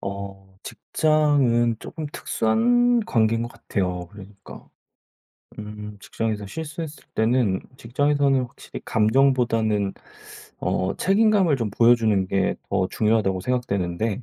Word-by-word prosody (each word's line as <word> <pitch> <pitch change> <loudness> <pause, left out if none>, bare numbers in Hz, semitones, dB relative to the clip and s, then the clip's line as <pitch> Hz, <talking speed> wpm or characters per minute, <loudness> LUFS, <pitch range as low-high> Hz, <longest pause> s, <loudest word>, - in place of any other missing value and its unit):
어 95 -1 -7
직장은 140 -7 +1
쪼금 155 -2 -7
특수한 240 - +2
관계인 115 - +1
것 120 - -4
같아요. 90 -3 -3
그러니까 100 0 -13 0.9
음 105 0 -8
직장에서 105 -2 -3
실수했을 160 - -7
때는 110 -4 +1 0.2
직장에서는 140 +2 +1
확실히 120 - -10
감정보다는 110 -3 +2 0.7
어 95 +1 -1
책임감을 195 -6 +3
좀 115 -4 -2
보여주는 110 -3 +3
게 95 -1 0
더 95 -2 +1
중요하다고 105 -4 +1
생각되는데. 105 -2 -2
115 Hz, 280 characters per minute, -23 LUFS, 100-140 Hz, 0.9 s, 책임감을